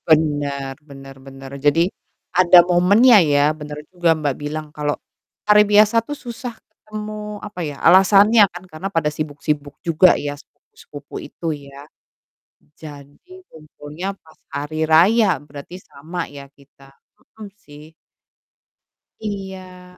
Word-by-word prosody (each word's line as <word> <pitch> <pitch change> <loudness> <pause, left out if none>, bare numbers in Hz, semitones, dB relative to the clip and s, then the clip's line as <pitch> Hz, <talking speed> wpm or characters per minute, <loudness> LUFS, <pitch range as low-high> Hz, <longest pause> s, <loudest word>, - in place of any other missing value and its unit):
Bener 145 -3 +1 0.2
bener 135 -1 -12
bener. 135 0 -12
Jadi, 150 +4 +3 0.5
ada 180 0 +6
momennya 200 +7 +5
ya, 145 -3 +2
bener 150 -1 -9
juga 175 -3 +2
Mbak 145 -4 -2
bilang, 155 +1 -5
kalau 150 -1 -2 0.5
hari 210 0 +6
biasa 210 +2 +4
tuh 290 - -4
susah 240 -2 -8
ketemu, 215 -1 -9
apa 205 -3 -9
ya, 150 -3 -4
alasannya 200 +5 +6
kan 180 +1 -11
karena 155 +5 -6
pada 165 -5 0
sibuk-sibuk 145 -1 -4
juga 170 +2 +4
ya, 145 0 -4
sepupu-sepupu - - -15
itu - - -12 0.2
ya. 140 +1 -13 0.9
Jadi, 150 - -13
kumpulnya 155 +2 -10 0.2
pas 160 - -22 0.2
hari 150 +3 -3
raya, 185 +5 +4
berarti 145 +4 -11
sama 165 +5 -6
ya 140 -1 -11
kita, 140 -1 -21 0.5
mhm, 215 -2 -8
sih. 150 -2 -16 1.3
Iya. 185 -3 -8
160 Hz, 125 wpm, -20 LUFS, 145-195 Hz, 1.3 s, ada